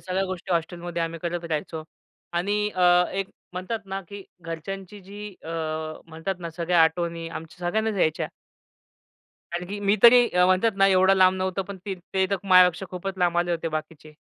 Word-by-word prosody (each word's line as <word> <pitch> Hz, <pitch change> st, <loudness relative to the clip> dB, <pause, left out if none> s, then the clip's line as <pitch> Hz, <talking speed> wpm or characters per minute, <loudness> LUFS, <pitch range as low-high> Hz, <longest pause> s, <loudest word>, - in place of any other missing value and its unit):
सगळ्या 190 Hz, +1 st, -1 dB
गोष्टी 185 Hz, -1 st, -4 dB
हॉस्टेलमध्ये 170 Hz, 0 st, -2 dB
आम्ही 165 Hz, 0 st, -3 dB
करत 175 Hz, 0 st, -3 dB
राहायचो 155 Hz, 0 st, -3 dB, 0.6 s
आणि 200 Hz, +4 st, 0 dB
अ, 180 Hz, -2 st, +4 dB
एक 195 Hz, 0 st, -2 dB, 0.2 s
म्हणतात 185 Hz, +5 st, -3 dB
ना, 195 Hz, 0 st, -4 dB
की 200 Hz, 0 st, -8 dB, 0.2 s
घरच्यांची 190 Hz, +4 st, -7 dB
जी 205 Hz, +2 st, -9 dB
अ, -, -, -10 dB, 0.6 s
म्हणतात 165 Hz, +4 st, -4 dB
ना, 170 Hz, -1 st, -5 dB
सगळ्या 170 Hz, +1 st, +2 dB
आठवणी 165 Hz, 0 st, 0 dB
आमच्या 165 Hz, +2 st, -7 dB
सगळ्यांनाच 220 Hz, +2 st, 0 dB
यायच्या. 155 Hz, -, +1 dB, 1.2 s
कारण 175 Hz, +1 st, -3 dB
की 205 Hz, +1 st, -4 dB
मी 200 Hz, +2 st, +4 dB
तरी 240 Hz, +1 st, +8 dB
अ, 180 Hz, 0 st, +3 dB
म्हणतात 185 Hz, +5 st, +3 dB
ना, 195 Hz, 0 st, +5 dB
एवढं 190 Hz, 0 st, +5 dB
लांब 185 Hz, -1 st, +5 dB
नव्हतो. 185 Hz, +1 st, -1 dB
पण 200 Hz, +1 st, -8 dB
ते 190 Hz, 0 st, -2 dB
तर 200 Hz, -, +2 dB
माझ्यापेक्षा 185 Hz, -1 st, +5 dB
खूपच 190 Hz, +1 st, -5 dB
लांब 175 Hz, -1 st, +2 dB
आले 175 Hz, 0 st, +1 dB
होते 165 Hz, -1 st, -1 dB
बाकीचे. 155 Hz, 0 st, -6 dB
180 Hz, 170 wpm, -25 LUFS, 170-195 Hz, 1.2 s, तरी